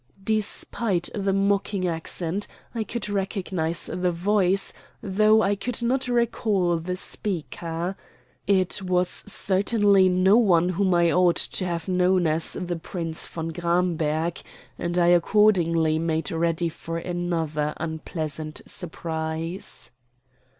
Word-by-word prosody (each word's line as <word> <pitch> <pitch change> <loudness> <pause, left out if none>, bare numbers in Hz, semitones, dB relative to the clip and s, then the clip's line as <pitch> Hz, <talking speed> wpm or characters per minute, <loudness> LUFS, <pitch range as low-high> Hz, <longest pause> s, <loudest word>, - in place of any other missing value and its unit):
Despite 215 -2 -1
the 200 -2 0
mocking 195 -1 +1
accent, 170 +3 -2 0.3
I 230 -2 -1
could 215 0 -4
recognize 190 -5 -2
the 180 0 -1
voice, 195 +2 +1 0.3
though 215 +2 +4
I 205 - +2
could 240 +4 -4
not 255 +2 0
recall 220 -7 +1
the 180 +3 -3
speaker. 175 -2 -3 0.5
It 190 -1 +2
was 180 -1 +1 0.2
certainly 200 -1 +3
no 185 +3 +4
one 180 -7 +4
whom 185 0 +1
I 170 -1 +4
ought 180 -1 +4
to 185 - -1
have 170 0 -3
known 180 -1 +2
as 160 +1 +1
the 175 -1 -3
Prince 165 -1 -4
von 165 0 -5
Gramberg, 170 -2 0 0.3
and 175 +1 -3
I 175 - +4
accordingly 170 -4 +3
made 160 -2 -1
ready 165 +1 0
for 165 +1 -6
another 165 -4 -2
unpleasant 160 -1 -5
surprise. 160 0 -4
180 Hz, 120 wpm, -25 LUFS, 165-195 Hz, 0.5 s, though